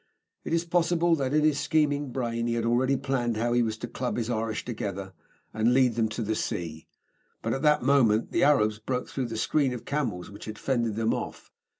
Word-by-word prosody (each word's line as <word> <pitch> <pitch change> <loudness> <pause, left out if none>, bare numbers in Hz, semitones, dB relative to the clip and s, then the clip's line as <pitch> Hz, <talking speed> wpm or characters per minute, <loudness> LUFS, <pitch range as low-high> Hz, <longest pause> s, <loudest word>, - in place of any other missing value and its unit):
It - - -5
is 165 +1 +1
possible 170 0 +2
that, 135 -2 -1
in 150 +1 +3
his 150 -2 +3
scheming 145 -2 +1
brain, 115 -2 -2
he 115 - 0
had 115 -1 -1
already 130 +3 +2
planned 125 -4 -1
how 120 +2 0
he 120 - +3
was 110 -2 -1
to 120 - -5
club 125 +1 -3
his 120 0 -1
Irish 110 -1 -2
together 100 -5 -5 0.4
and 110 +3 +2
lead 130 -2 +4
them 110 -1 +1
to 110 +2 -3
the 110 +1 -1
sea. 80 -6 -4 0.6
But - - 0
at 135 - -2
that 150 -2 +3
moment 125 -5 +3
the 170 - +2
Arabs 110 -9 +3
broke 125 +3 -3
through 130 -3 -3
the 115 -1 -5
screen 135 +3 +1
of 120 - -7
camels 115 -12 -2
which 100 - -10
had 110 -1 -7
fended 120 -5 0
them 115 0 +1
off. - - -6
120 Hz, 220 wpm, -27 LUFS, 110-140 Hz, 0.6 s, lead